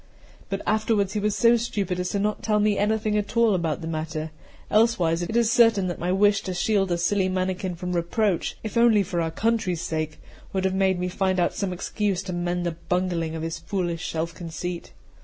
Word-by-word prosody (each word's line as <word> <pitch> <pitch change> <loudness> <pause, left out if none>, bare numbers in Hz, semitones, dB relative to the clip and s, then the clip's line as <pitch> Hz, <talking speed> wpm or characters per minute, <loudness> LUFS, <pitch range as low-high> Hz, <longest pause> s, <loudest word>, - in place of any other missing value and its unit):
But 195 0 -3
afterwards 215 -2 +1
he 210 - 0
was 210 0 0
so 235 +3 +5
stupid 200 -6 -2
as 180 +2 -2
not 210 +1 0
to - - -19
tell 210 -1 +1
me 210 0 +3
anything 215 +1 +1
at 205 +3 -5
all 230 -2 +5
about 170 -3 -1
the 165 - -5
matter; 155 -1 -4 0.4
elsewise, 185 -7 +3
it 220 +7 -1
is 235 -1 +3
certain 225 -5 +5
that 175 - -5
my 175 +1 -1
wish 200 +1 +3
to 185 - -4
shield 195 0 +1
a 175 - +2
silly 185 +2 +1
mannikin 185 0 -2
from 180 +1 -4
reproach, 175 +2 0
if 220 +1 -4
only 230 -3 +5
for 175 -2 -2
our 165 - 0
country's 200 -2 0
sake, 155 -1 -3 0.3
would 190 -1 0
have 190 - +1
made 190 -1 +2
me 180 - -1
find 185 0 0
out 175 - +2
some 195 -2 -2
excuse 195 +1 -2
to 185 -2 -5
mend 175 0 -1
the 170 -2 -3
bungling 175 -3 0
of 160 - -4
his 165 0 -4
foolish 170 -1 -3
self 165 +1 -2
conceit. 175 +1 -6
185 Hz, 215 wpm, -25 LUFS, 175-210 Hz, 0.4 s, so